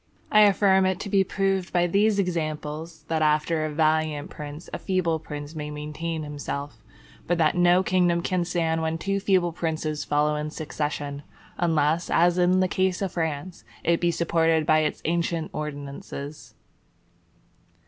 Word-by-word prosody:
I 215 - +7
affirm 190 -2 +4
it 190 -1 -1
to 200 - -5
be 195 -1 +4
proved 195 -1 -1
by 175 -1 +2
these 200 +4 +2
examples, 160 -3 -3
that 160 0 -1
after 155 +1 +2
a - - -2
valiant 155 -1 +1
prince 150 +2 -8
a - - -3
feeble 175 -4 0
prince 150 -1 -7
may 150 -2 -5
maintain 150 +2 -4
himself; 145 -1 -5 0.5
but 175 - +1
that 155 -2 +3
no 175 +1 +4
kingdom 175 -2 +2
can 180 -1 0
stand 165 -2 0
when 160 0 -1
two 195 +4 -1
feeble 185 -3 +2
princes 155 -2 -2
follow 150 +1 +1
in 150 0 -3
succession, 150 -2 -4 0.4
unless, 160 0 +1
as 175 +1 +3
in 180 +1 +4
the 185 - +3
case 185 -1 0
of 190 - -2
France, 165 -3 -3 0.2
it 170 0 +2
be 175 - +3
supported 165 -2 +2
by 155 0 +4
its 155 -1 -2
ancient 170 -1 -1
ordinances. 145 0 -7
165 Hz, 160 wpm, -25 LUFS, 150-180 Hz, 0.5 s, I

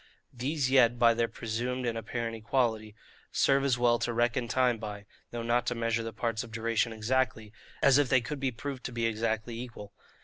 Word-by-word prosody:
These 130 +2 -1
yet, 120 -3 +5
by 120 -1 +5
their 115 0 +1
presumed 125 +3 -3
and 115 -1 -1
apparent 115 +1 -3
equality, 110 -2 -1 0.4
serve 135 0 +3
as 135 -3 +2
well 120 -1 +3
to 120 - -1
reckon 120 +1 +1
time 125 -1 +2
by 105 -2 -7 0.2
(though 120 -1 -5
not 120 +1 +1
to 125 - 0
measure 115 0 0
the 115 0 -5
parts 115 +1 -2
of 115 - -11
duration 115 +1 0
exactly) 110 -1 -1 0.3
as 135 +1 +6
if 145 -3 +2
they 130 - +5
could 130 +5 -5
be 135 -1 0
proved 130 +2 -6
to - - -3
be 115 -1 -1
exactly 115 +1 -1
equal. 110 -5 -9
120 Hz, 200 wpm, -30 LUFS, 115-125 Hz, 0.4 s, as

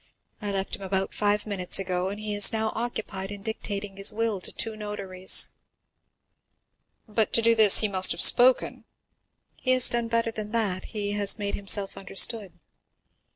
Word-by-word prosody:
I 205 -1 -3
left 195 -1 -3
him - - -16
about 190 0 -3
five 205 0 -1
minutes 195 -4 0
ago, 185 -1 -3
and 205 +1 -7
he 215 -1 -5
is 205 -1 +4
now 220 0 -2
occupied 220 -5 -5
in 205 -1 -10
dictating 205 -2 -6
his 195 - +2
will 220 -3 -2
to - - -4
two 225 -1 -3
notaries." 200 -3 0 1.6
"But 215 0 -1
to 230 - +2
do 230 0 +4
this 220 -3 +6
he 215 - 0
must 190 -2 +5
have - - -3
spoken?" 250 +1 +4 0.7
"He 255 - 0
has 255 -1 +4
done 235 -1 -2
better 230 0 -1
than 215 0 -7
that—he 205 -1 -3
has 205 -1 +1
made 200 -1 -4
himself 200 0 +1
understood." 195 0 0
205 Hz, 165 wpm, -25 LUFS, 195-220 Hz, 1.6 s, this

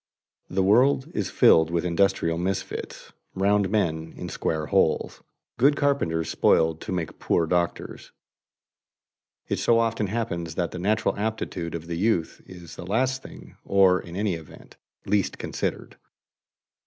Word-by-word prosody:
The 95 +1 0
world 130 - +3
is 105 - -2
filled 80 0 +5
with 85 0 -1
industrial 85 -2 +1
misfits, 95 +2 -4 0.2
"round 100 +1 +2
men 80 -6 -1
in - - -6
square 80 -1 -2
holes," - - +1 0.4
good 140 +4 +5
carpenters 110 - 0
spoiled 80 0 +2
to - - -6
make 85 -4 -4
poor 85 - +1
doctors. 85 +1 -2 1.4
It - - -1
so 115 - +3
often 115 -2 0
happens 85 -7 -3
that 85 -1 -1
the 90 - -6
natural 105 +5 +1
aptitude 100 -6 -3
of 85 -1 -6
the 85 0 -4
youth 95 -5 0
is 85 -3 -11
the - - -7
thing - - -10
last 130 +4 0 0.4
or, 95 -2 +4
in 85 0 -10
any 100 -1 0
event, 80 -2 -11 0.3
least 105 -2 0
considered. - - -4
95 Hz, 140 wpm, -25 LUFS, 85-110 Hz, 1.4 s, filled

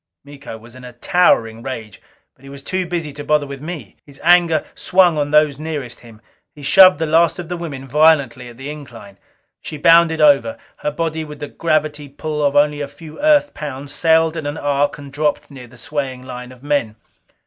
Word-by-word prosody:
Miko 140 -5 -10
was 115 +1 -16
in 130 0 -13
a 125 -1 -10
towering 120 -6 +1
rage. 115 -5 -7 0.3
But - - -30
he 135 - -12
was 140 0 -11
too 185 +2 -2
busy 165 -4 -4
to 145 +1 -8
bother 150 0 +1
with 140 -1 -9
me; 150 - -8
his 140 -2 -15
anger 170 -3 +4
swung 180 -3 +3
on 145 -1 -1
those 150 -2 +3
nearest 150 -6 -5
him. 115 -2 -16 0.3
He 145 - -12
shoved 185 +5 +7
the 160 - -1
last 165 +1 +2
of 175 -2 -7
the 180 - -3
women 145 -6 -7
violently 140 -4 +2
at 120 - -14
the 135 +3 -6
incline. 115 -9 -12 0.4
She 155 - -7
bounded 165 +1 +4
over. 140 -7 +4 0.2
Her - - -2
body, 160 +1 -3
with 150 -1 -10
the 145 - -6
gravity 150 -3 -1
pull 150 +2 -4
of 145 0 +1
only 145 0 +2
a 145 - -3
few 155 - -12
Earth 295 -1 +3
pounds, 140 -1 -7
sailed 160 0 +2
in 160 -3 -4
an 145 +2 -4
arc 145 0 0
and 140 -1 -12
dropped 150 -1 -1
near 130 -3 -11
the 125 +1 -18
swaying 130 -1 -5
line 125 -1 -9
of 130 +1 -16
men. 140 -7 -1
145 Hz, 205 wpm, -18 LUFS, 130-160 Hz, 0.4 s, shoved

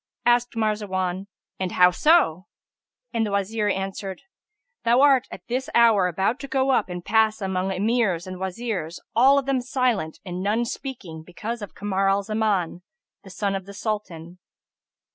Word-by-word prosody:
Asked 240 0 +3
Marzawan, 200 -4 -1 0.3
And 185 -1 -2
how 180 0 +6
so?"; 190 - +3 0.7
and 230 -1 +1
the 215 - -1
Wazir 205 +2 -1
answered, 195 0 -4 0.6
"Thou 235 +2 +4
art 275 -3 +5
at 180 - -10
this 255 +3 -2
hour 225 -6 +5
about 190 - 0
to 275 - -7
go 265 0 +1
up 255 - +1
and 175 -1 -6
pass 220 +1 +3
among 190 -1 -1
Emirs 195 -3 0
and 185 0 -7
Wazirs 190 -3 -4 0.2
all 265 +4 +6
of 275 - 0
them 270 -2 +1
silent 245 - -1
and 180 0 -5
none 215 +5 +1
speaking, 230 - -7
because 215 +7 -6
of 205 - -8
Kamar 195 -1 0
al 200 +1 +2
Zaman 205 -5 -1 0.4
the 195 - -12
son 200 +1 -2
of 195 -1 -4
the 200 - -10
Sultan." 185 -5 -5
205 Hz, 160 wpm, -24 LUFS, 185-235 Hz, 0.7 s, how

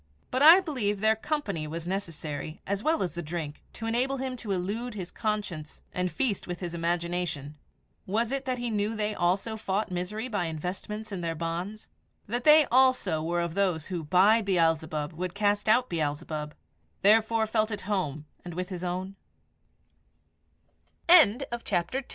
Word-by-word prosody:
But 255 - 0
I 330 +6 +9
believe 220 - -1
their 220 +1 +3
company 220 - -3
was 165 +2 -5
necessary 160 -5 -4
as 200 +1 -2
well 315 +1 +1
as 180 - -2
the 175 - -4
drink 155 -2 -5
to 225 - -7
enable 250 +4 +1
him 260 -1 -3
to 220 -3 -5
elude 205 +6 -2
his 180 -4 -6
conscience 205 -8 -4
and 180 0 -1
feast 240 -8 -1
with 175 -1 -4
his 175 -2 -5
imagination. 170 -3 -2 0.5
Was 225 +5 0
it 275 0 -2
that 255 -1 -1
he 240 -1 -3
knew 210 +1 0
they 215 0 -1
also 195 +4 0
fought 205 -1 -2
misery 180 +6 -3
by 205 -7 -1
investments 190 +7 -5
in 190 -3 -4
her 165 -1 -2
bonds 170 +6 -4 0.4
that 240 +4 -3
they 305 0 +8
also 255 -11 +3
were 170 +2 0
of 170 -1 -2
those 180 -5 0
who 170 -2 -2
by 190 +8 +5
Beelzebub 165 -5 +1
would 180 +2 -4
cast 205 0 +1
out 250 +3 +4
Beelzebub 150 -2 -3 0.5
therefore 220 +2 +4
felt 220 0 +1
at 205 -2 -4
hom 155 -7 -2
195 Hz, 150 wpm, -28 LUFS, 170-220 Hz, 0.5 s, I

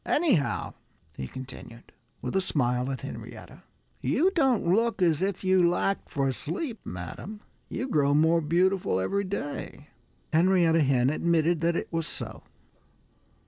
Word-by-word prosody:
"Anyhow," 275 - +1 0.4
he 65 -4 -6
continued, 130 - -10 0.3
with - - -3
a 190 - +3
smile 125 -6 0
at 130 - -5
Henrietta, - - -9 0.4
"you 370 +5 +2
don't 270 - +2
look 225 +6 +2
as 170 -4 +2
if 195 0 -1
you 185 -2 +4
lacked 195 +3 -1
for 135 -1 0
sleep, 215 - -4
madam. 90 - -7 0.3
You 255 - -3
grow 145 - +2
more 160 +2 +4
beautiful 175 - +1
every 200 - 0
day." 145 -5 -5 0.4
Henrietta 170 -1 +4
Hen 135 -2 +3
admitted 165 +1 +1
that 170 0 +2
it - - -4
was 165 -1 -1
so. - - -6
170 Hz, 140 wpm, -27 LUFS, 140-190 Hz, 0.4 s, you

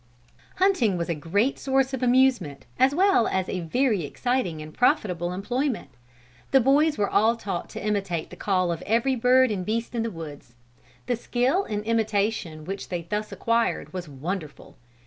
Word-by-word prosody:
Hunting 270 - +2
was 170 0 -3
a - - +2
great 195 - 0
source 270 -1 +1
of 265 - -3
amusement 245 - +2
as 270 +2 +4
well 380 - +4
as 190 -1 -1
a 185 - -3
very 205 +3 +1
exciting 215 - -1
and 155 0 -9
profitable 180 - +1
employment. 245 +8 -2 0.6
The 270 - +5
boys 290 +5 +3
were 205 - +1
all 220 +4 +3
taught 195 -6 -5
to - - -7
imitate 195 -6 -2
the - - -8
call 185 -3 0
of 165 0 -4
every 235 +5 +2
bird 255 +1 +4
and 190 -3 -2
beast 225 +5 -2
in 235 - -1
the 230 - -1
woods. 150 - -10 0.5
The 245 - 0
skill 255 - 0
in 210 -1 -3
imitation 210 -7 -1
which 195 +3 -6
they 175 -2 -3
thus 210 +5 -3
acquired 230 -3 0
was 180 -4 -5
wonderful. 155 +3 -6
215 Hz, 170 wpm, -25 LUFS, 175-250 Hz, 0.6 s, The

